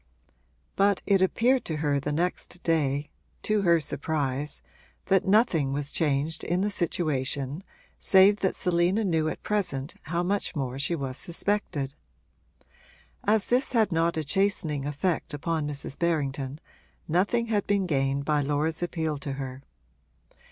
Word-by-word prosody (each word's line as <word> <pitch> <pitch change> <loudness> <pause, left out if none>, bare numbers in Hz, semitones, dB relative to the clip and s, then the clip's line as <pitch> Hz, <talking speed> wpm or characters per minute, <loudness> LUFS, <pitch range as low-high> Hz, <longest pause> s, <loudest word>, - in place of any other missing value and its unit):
But 200 0 +2
it 195 -2 +3
appeared 245 +7 +3
to 160 - -2
her 145 -2 +1
the 145 +2 -3
next 175 +2 -2
day, 145 -3 0 0.3
to 215 -1 +1
her 170 -3 +4
surprise, 145 -1 -2 0.4
that 190 0 +2
nothing 190 - +3
was 145 0 -3
changed 155 0 0
in 175 +2 0
the 205 +1 0
situation 145 -4 0 0.4
save 195 +2 +5
that 190 - 0
Selina 180 +4 +1
knew 160 -5 +1
at - - -7
present 175 -9 -1
how 170 +2 -2
much 195 0 -1
more 135 -2 -3
she 170 +5 0
was 135 -4 -4
suspected. 170 -6 -1 1.3
As 210 -1 +2
this 255 +2 +1
had 220 -4 +3
not 165 0 +1
a 160 - 0
chastening 155 -4 0
effect 150 +2 -1
upon 155 +1 -2
Mrs. 145 -1 -4
Berrington 140 -4 -1 0.5
nothing 200 +8 +1
had 205 -2 0
been 200 -2 +2
gained 140 -3 0
by 150 -1 +2
Laura's 150 +3 -1
appeal 160 -4 -2
to 140 0 -4
her. 135 -1 -6
160 Hz, 145 wpm, -27 LUFS, 140-190 Hz, 1.3 s, save